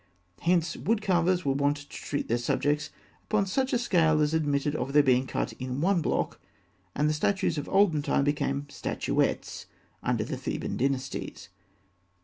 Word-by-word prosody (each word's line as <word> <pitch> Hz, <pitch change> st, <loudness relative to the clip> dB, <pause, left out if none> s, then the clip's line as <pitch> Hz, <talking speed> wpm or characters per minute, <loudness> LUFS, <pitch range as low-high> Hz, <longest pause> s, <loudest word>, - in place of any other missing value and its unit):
Hence, 170 Hz, -2 st, +1 dB
wood 225 Hz, +1 st, 0 dB
carvers 180 Hz, -1 st, +2 dB
were 135 Hz, -, +2 dB
wont 145 Hz, +1 st, +1 dB
to 145 Hz, 0 st, -12 dB
treat 145 Hz, -, -4 dB
their 120 Hz, +1 st, +1 dB
subjects 145 Hz, +5 st, 0 dB, 0.4 s
upon 210 Hz, -2 st, +1 dB
such 260 Hz, +7 st, 0 dB
a -, -, +3 dB
scale 165 Hz, -10 st, +3 dB
as 150 Hz, +1 st, +2 dB
admitted 145 Hz, -2 st, 0 dB
of 135 Hz, -1 st, -3 dB
their 145 Hz, 0 st, +6 dB
being 130 Hz, -1 st, +3 dB
cut -, -, -2 dB
in 130 Hz, +1 st, -3 dB
one 180 Hz, +2 st, +2 dB
block, -, -, -1 dB, 0.5 s
and 150 Hz, +2 st, +2 dB
the 155 Hz, -, +2 dB
statues 170 Hz, 0 st, 0 dB
of 145 Hz, -, -6 dB
olden 190 Hz, -6 st, +3 dB
time 140 Hz, -, +1 dB
became 145 Hz, -1 st, 0 dB
statuettes 145 Hz, -, -2 dB, 0.3 s
under -, -, 0 dB
the -, -, -4 dB
Theban -, -, -3 dB
dynasties. 135 Hz, -6 st, -3 dB
150 Hz, 165 wpm, -28 LUFS, 140-180 Hz, 0.5 s, their